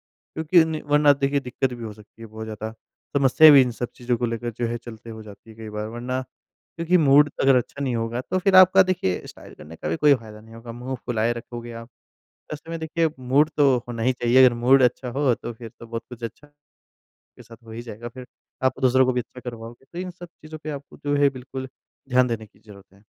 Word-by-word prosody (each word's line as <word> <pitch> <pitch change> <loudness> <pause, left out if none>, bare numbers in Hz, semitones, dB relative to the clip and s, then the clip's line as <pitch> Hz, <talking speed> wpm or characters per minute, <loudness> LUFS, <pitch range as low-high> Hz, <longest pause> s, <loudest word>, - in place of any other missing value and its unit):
क्योंकि 160 +3 0
ज़िनी 160 -1 0
वरना 145 0 +5
देखिए, 140 0 0
दिक्कत 125 0 -2
भी 120 -1 -7
हो 110 - -6
सकती 105 +2 -17
है 115 - -8
बहुत 110 +1 -8
ज़्यादा। 110 0 -6 0.4
समस्या 140 +3 +7
भी 140 - +9
इन 125 - -1
सब 120 +1 -4
चीज़ों 120 -1 -1
को 120 - 0
लेकर 115 +1 -3
जो 120 - 0
है 120 - -2
चलते 115 -1 -11
हो 110 0 -9
जाती 110 +1 -14
है 110 - -15
कई 110 -1 -9
बार, 105 0 -4
वरना 125 +3 -4
क्योंकि 170 +6 -4
मूड 145 -1 +5
अगर 135 -1 +5
अच्छा 140 +3 -2
नहीं 125 -3 -1
होगा, 115 +2 -2
तो 185 +8 -2
फिर 190 0 +3
आपका 185 +1 +8
देखिए 180 - -2
स्टाइल - - -13
करने 80 +2 -12
का 75 - -5
भी 80 - -1
कोई 145 -1 +5
फायदा 110 -4 -9
नहीं 115 +1 -16
होगा, 115 0 -9
मुँह 125 +3 -6
फुलाए 115 -1 0
रखोगे 120 0 -8
आप। 115 - -15 0.6
ऐसे 155 +2 -10
में 165 0 -4
देखिए 160 0 0
मूड 135 +5 +2
तो 135 -4 +4
होना 115 -2 -4
ही 130 +2 +2
चाहिए। 125 +2 +4
अगर 125 - +4
मूड 130 +3 +4
अच्छा 125 +1 +1
हो 135 0 +1
तो 120 - -7
फिर 115 0 -10
तो 115 - -11
बहुत 115 0 -5
कुछ 120 -1 -11
अच्छा 115 +6 -7
के 145 0 -40 0.7
साथ 115 0 -14
हो 115 - -13
ही 115 +1 -6
जाएगा, 120 0 -8
फिर 125 +1 -11 0.4
आप 130 0 +1
दूसरों 130 0 +4
को 130 - +2
भी 125 - 0
अच्छा 125 +2 -11
करवाओगे। 115 +2 -11
तो 175 - -7
इन 185 0 -4
सब 175 0 -12
चीज़ों 155 -1 -12
पे 155 - -4
आपको 140 -1 -9
जो 145 0 +2
है 145 0 +4
बिल्कुल 130 0 -8 0.4
ध्यान 125 0 +4
देने 115 -2 -4
की 105 - -28
ज़रूरत 100 -3 -16
है। 100 - -23
125 Hz, 240 wpm, -23 LUFS, 115-145 Hz, 0.7 s, भी